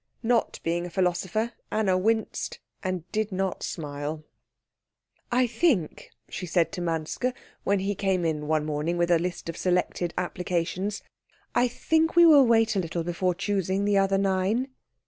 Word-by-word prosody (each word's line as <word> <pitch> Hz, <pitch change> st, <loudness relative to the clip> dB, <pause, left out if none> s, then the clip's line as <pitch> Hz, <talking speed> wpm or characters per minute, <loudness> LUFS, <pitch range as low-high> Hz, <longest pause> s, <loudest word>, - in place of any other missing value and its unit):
Not 235 Hz, 0 st, +1 dB
being 175 Hz, +1 st, -1 dB
a -, -, -8 dB
philosopher, 185 Hz, +5 st, 0 dB, 0.2 s
Anna 210 Hz, -4 st, +2 dB
winced 220 Hz, +4 st, 0 dB, 0.3 s
and 185 Hz, -3 st, -2 dB
did 215 Hz, -1 st, -1 dB
not 190 Hz, 0 st, -2 dB
smile. 150 Hz, 0 st, -4 dB, 1.1 s
"I 250 Hz, +1 st, +4 dB
think," 235 Hz, -, 0 dB, 0.2 s
she 180 Hz, -, -6 dB
said 165 Hz, -1 st, +2 dB
to 180 Hz, -, -5 dB
Manske, 165 Hz, +9 st, -1 dB, 0.3 s
when 200 Hz, -1 st, +2 dB
he 200 Hz, +1 st, 0 dB
came 190 Hz, -3 st, 0 dB
in 150 Hz, -2 st, -1 dB
one 155 Hz, -1 st, +1 dB
morning 155 Hz, +3 st, -1 dB
with 175 Hz, 0 st, +1 dB
a 170 Hz, -, +5 dB
list 175 Hz, 0 st, -4 dB
of 165 Hz, -, -4 dB
selected 180 Hz, -1 st, 0 dB
applications, 180 Hz, +2 st, -2 dB, 0.5 s
"I 245 Hz, -, +3 dB
think 320 Hz, +7 st, +1 dB
we 345 Hz, 0 st, +8 dB
will 290 Hz, -6 st, +7 dB
wait 225 Hz, -2 st, +3 dB
a -, -, +2 dB
little 170 Hz, -1 st, -2 dB
before 175 Hz, +1 st, -1 dB
choosing 195 Hz, 0 st, -1 dB
the 205 Hz, -1 st, +3 dB
other 195 Hz, 0 st, +2 dB
nine." 195 Hz, +6 st, +1 dB
185 Hz, 160 wpm, -26 LUFS, 170-215 Hz, 1.1 s, we